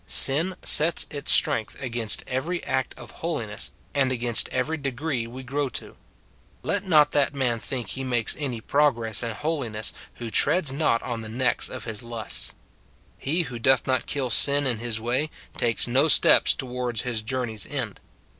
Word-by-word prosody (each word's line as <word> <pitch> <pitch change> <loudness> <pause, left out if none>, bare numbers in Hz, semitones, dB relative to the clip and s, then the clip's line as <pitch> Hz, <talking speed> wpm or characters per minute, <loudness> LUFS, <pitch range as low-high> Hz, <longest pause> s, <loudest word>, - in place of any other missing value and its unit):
Sin 165 +7 +3
sets 160 +2 +4
its 145 -1 0
sti - - +4
ength 110 - -12
against 120 -4 +2
every 160 +8 -3
act 130 -1 -2
of - - -11
holiness, - - -3 0.2
and 135 -2 +1
against 120 -2 +3
every 130 +5 -1
degree 135 -3 -3
we 130 +3 -9
grow 140 +2 -2
to. - - -7 0.7
Let 200 -1 -1
not 155 -6 +4
that 145 -1 +1
man 125 -4 -1
think 120 -2 -6
he 135 - -5
makes 120 -3 -1
any 130 -6 -4
progress 120 -6 +1
in 115 - -3
holiness 115 -4 -2 0.2
who 115 -2 -7
treads 165 +1 +3
not 135 -5 0
on 120 -2 -4
the 110 - -8
necks 120 +2 0
of 130 -3 -7
his 110 -1 -3
lusts. 115 -3 -2 0.6
He 165 +6 -1
who 125 -6 -7
doth 130 +2 +3
not 130 -2 -1
kill 135 -4 -2
sin 145 0 +5
in 120 -4 -1
his 115 -1 -2
way, 125 +7 -1 0.3
takes 115 -3 +1
no 135 +5 +3
steps 145 - +5
towards 125 -2 -3
his 120 -3 -2
journey's 110 -2 -3
end. - - -5
130 Hz, 175 wpm, -25 LUFS, 115-140 Hz, 0.7 s, sin